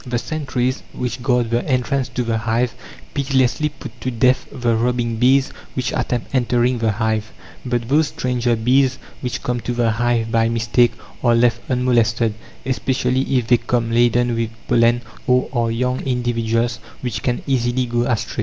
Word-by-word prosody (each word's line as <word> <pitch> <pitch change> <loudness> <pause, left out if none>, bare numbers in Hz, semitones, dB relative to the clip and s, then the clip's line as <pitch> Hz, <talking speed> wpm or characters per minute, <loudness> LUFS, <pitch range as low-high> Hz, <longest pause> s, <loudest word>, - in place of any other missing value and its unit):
The 125 -2 -2
sentries 130 -2 -2
which 125 -1 -4
guard 120 -2 +1
the 120 +1 +1
entrance 130 0 0
to 125 - -2
the 115 -1 -1
hive 115 +1 0 0.4
pitilessly 135 +1 +1
put 125 -5 -11
to 130 - -1
death 125 +2 +2
the 120 -4 0
robbing 120 0 0
bees 130 +3 +3 0.2
which 125 -2 -1
attempt 120 +1 -2
entering 125 -1 +2
the 110 -2 +1
hive; 110 0 -1 0.3
but 120 -2 -2
those 150 +4 +3
stranger 125 -3 0
bees 130 +3 +2 0.2
which 125 -2 -4
come 125 0 -1
to 120 - -3
the 120 -2 +1
hive 115 0 0
by 115 0 +3
mistake 115 +1 +2 0.3
are 120 -2 +4
left 120 0 +3
unmolested, 120 -3 +2 0.3
especially 130 0 0 0.2
if 125 - 0
they 120 +1 +4
come 115 -1 -1
laden 120 +1 +3
with 115 -1 -1 0.2
pollen, 120 0 +3 0.2
or 125 +1 +3
are 120 -2 +1
young 125 +2 -1
individuals 120 -2 0 0.2
which 115 -4 -3
can 120 0 -1
easily 125 -1 +1
go 120 0 0
astray. 120 -3 -2
120 Hz, 165 wpm, -20 LUFS, 115-125 Hz, 0.4 s, are